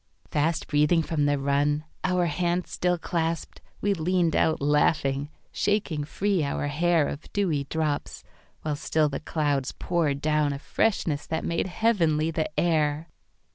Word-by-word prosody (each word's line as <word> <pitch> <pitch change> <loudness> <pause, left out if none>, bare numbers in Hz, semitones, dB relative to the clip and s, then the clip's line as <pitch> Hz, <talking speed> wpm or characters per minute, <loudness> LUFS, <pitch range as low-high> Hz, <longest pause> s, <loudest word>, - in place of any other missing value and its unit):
Fast 160 +2 +1
breathing 150 +3 +3
from 150 -2 0
the 145 0 +2
run, 145 +2 +1 0.2
our 180 -1 +2
hands 175 +2 -1
still 180 0 +1
clasped, 165 -1 -3 0.2
We 205 0 +2
leaned 175 -1 +1
out 160 - +2
laughing, 145 -1 +1 0.2
shaking 185 -8 0
free 190 +2 0
our 145 0 -2
hairOf 160 -1 0
dewy 165 -9 0
drops, 155 -1 -2 0.4
while 150 -1 -1
still 155 +1 +1
the 140 - -4
clouds 145 -4 -1
poured 160 -6 0
downA 150 -1 +1
freshness 155 -6 0
that 160 0 -2
made 170 +2 0
heavenly 170 -7 +1
the 160 -1 -1
air. 155 -1 +1
155 Hz, 135 wpm, -26 LUFS, 145-175 Hz, 0.4 s, breathing